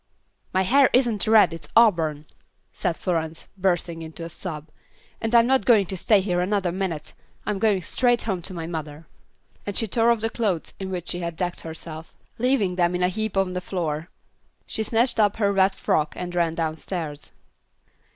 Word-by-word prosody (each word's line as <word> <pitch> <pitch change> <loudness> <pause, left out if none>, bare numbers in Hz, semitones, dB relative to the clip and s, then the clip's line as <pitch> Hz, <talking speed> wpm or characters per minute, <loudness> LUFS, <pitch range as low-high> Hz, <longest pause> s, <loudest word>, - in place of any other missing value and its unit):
"My 190 - +2
hair 265 +7 +5
isn't 240 -5 +2
red, 215 -5 +6
it's 165 -3 -8
auburn," 165 -10 +4 0.5
said 165 - -1
Florence, 165 -3 -3
bursting 175 -3 -1
into 160 +1 -8
a - - -6
sob, 160 -3 -7 0.5
"and 225 +1 0
I'm 230 0 +7
not 265 -2 +3
going 210 -2 +5
to 190 - -5
stay 200 +2 +3
here 180 -2 0
another 190 -1 0
minute. 180 -4 -4 0.3
I'm 210 -2 -1
going 205 -4 +2
straight 245 +3 +1
home 190 -5 -2
to 185 +3 -5
my 165 -1 -4
mother." 155 -2 -6 0.6
And 205 - -4
she 225 - +1
tore 230 +3 +2
off 235 -2 +2
the 225 0 -1
clothes 200 -8 -1
in 190 -1 -4
which 180 -2 -5
she 175 - -2
had 170 -1 -4
decked 175 +1 -3
herself, 160 0 -8 0.2
leaving 225 -7 +1
them 175 0 +2
in 180 - 0
a 180 - +3
heap 220 +1 -3
on 190 -1 +1
the 180 - -3
floor. 165 -3 -3 0.6
She - - -4
snatched 230 +2 +2
up 205 -2 +3
her 200 -2 +2
wet 190 0 +3
frock 150 -1 0
and 180 0 -5
ran 170 -2 +1
downstairs. 160 -1 -4
185 Hz, 190 wpm, -24 LUFS, 165-215 Hz, 0.6 s, I'm